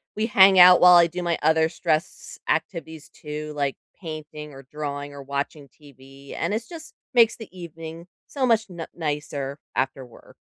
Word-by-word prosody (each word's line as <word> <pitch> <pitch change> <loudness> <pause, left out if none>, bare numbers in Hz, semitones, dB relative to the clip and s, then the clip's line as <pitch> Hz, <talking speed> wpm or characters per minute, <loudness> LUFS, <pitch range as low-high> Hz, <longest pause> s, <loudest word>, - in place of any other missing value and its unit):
we 215 - -1
hang 195 -3 +6
out 180 0 +9
while 180 0 +8
I 170 -1 +6
do 180 +2 -6
my 170 -1 0
other 160 0 +3
stress 160 0 -3
activities 160 -4 -3
too, 150 0 -7
like 140 -2 -1 0.3
painting 155 -2 -8
or 135 0 -12
drawing 145 -1 -5
or 140 - -9
watching 140 +1 -5
TV, 135 -1 -14
and - - -2
it’s 225 +2 -3
just 320 -2 -11 0.2
makes 235 -2 +5
the 225 - -10
evening 165 -1 -9 0.4
so 280 - -5
much 225 -1 +3
n 170 -3 -7
nicer 145 -3 -4 0.2
after 135 0 -1
work. 120 - -18
160 Hz, 170 wpm, -24 LUFS, 145-180 Hz, 0.4 s, out